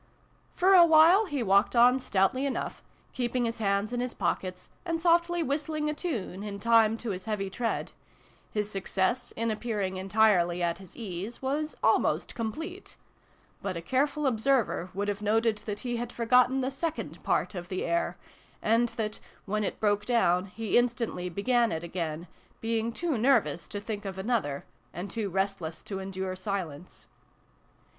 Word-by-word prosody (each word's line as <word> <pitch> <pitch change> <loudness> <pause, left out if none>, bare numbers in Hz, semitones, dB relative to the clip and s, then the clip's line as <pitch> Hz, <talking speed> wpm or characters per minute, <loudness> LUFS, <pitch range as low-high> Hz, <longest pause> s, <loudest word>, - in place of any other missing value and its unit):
For 380 +2 +4
a 360 -2 +9
while 335 +6 +6
he 285 -7 -2
walked 200 +3 +3
on 245 +2 +6
stoutly 210 +3 +1
enough, 270 - -3 0.3
keeping 245 0 0
his 230 0 -3
hands 200 +2 0
in 245 - -1
his 250 0 -3
pockets, 185 -1 -2 0.2
and 335 -2 -1
softly 340 0 +3
whistling 300 +2 -1
a - - -3
tune, 230 - -4
in 205 -1 -5
time 225 0 +4
to 230 -1 -3
his 185 -1 -5
heavy 195 -3 -2
tread: 230 +3 -2 0.6
his 210 -1 -1
success, 195 +4 -1
in 230 0 -1
appearing 210 -4 -2
entirely 185 -3 +3
at 170 0 0
his 190 -3 -14
ease, 205 +2 -5
was 295 +4 -1
almost - - +2
complete; 320 - -5 0.6
but 190 -3 -3
a - - -3
careful 285 - 0
observer 240 -6 +1
would 200 +1 -1
have 205 0 -2
noted 220 +1 +2
that 205 -1 -3
he 240 -2 -2
had 240 0 -4
forgotten 250 +3 +3
the 260 +1 -1
second 320 +4 -4
part - - 0
of 175 -2 -6
the 185 - -2
air, 170 +1 0 0.4
and 230 +2 +2
that, 215 -1 -2 0.3
when 215 +1 -1
it - - -3
broke 205 -1 +2
down, 190 -6 +2
he 220 +3 +1
instantly 235 -7 -1
began 235 +6 +2
it. 160 +1 -3
again, 170 -1 -4 0.3
being 225 0 -1
too 310 0 -1
nervous 220 - +2
to 205 - -5
think 205 0 -5
of 190 -1 -5
another, 190 - -1 0.3
and 180 +4 -5
too 220 -3 -2
restless 190 -4 -2
to 195 -2 -5
endure 190 -1 -4
silence. 185 -4 -5
220 Hz, 165 wpm, -29 LUFS, 190-250 Hz, 0.6 s, a